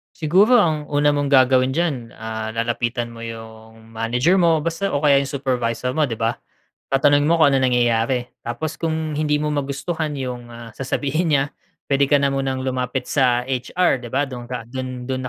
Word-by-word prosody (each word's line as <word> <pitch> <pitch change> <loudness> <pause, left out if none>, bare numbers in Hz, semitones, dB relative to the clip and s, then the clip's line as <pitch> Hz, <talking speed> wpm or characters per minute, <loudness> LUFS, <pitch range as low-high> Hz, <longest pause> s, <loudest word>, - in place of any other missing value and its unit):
Siguro 200 +10 +4
ang 155 -5 0
una 145 0 +3
mong 145 0 +1
gagawin 130 -1 +4
diyan, 140 -8 -2
ah, 110 0 -5
lalapitan 120 +1 -2
mo 115 0 -9
yung 110 0 -10
manager 120 +10 +1
mo 165 -3 +3
basta 165 +5 -2
o 145 - 0
kaya 145 -2 +5
yung 140 - +1 0.2
supervisor 125 -2 -1
mo, 155 - +4
‘di 125 - -4
ba? 115 +1 -1 0.5
Tatanungin 145 +2 +3
mo 170 - +4
kung 155 -4 +4
anong 130 -1 +3
nangyayari. 120 0 +1
Tapos 120 +7 -5
kung 160 -1 -2
hindi 150 0 +1
mo 150 0 -1
magustuhan 150 +2 -3
yung, 125 -3 -5
ah, 115 -1 -11
sasabihin 145 +6 -1
niya, 140 -3 +3 0.5
puwede 140 0 +3
ka 145 - +5
na 140 -1 +1
munang 135 -1 -2
lumapit 130 0 -2
sa 125 -3 +2
HR, 130 +4 0
‘di 120 - -8
ba? 135 +4 0
Dun 125 -3 -8
ka, 125 -2 -5
dun 130 +1 -6
dun 130 0 -3
130 Hz, 185 wpm, -21 LUFS, 120-150 Hz, 0.5 s, kaya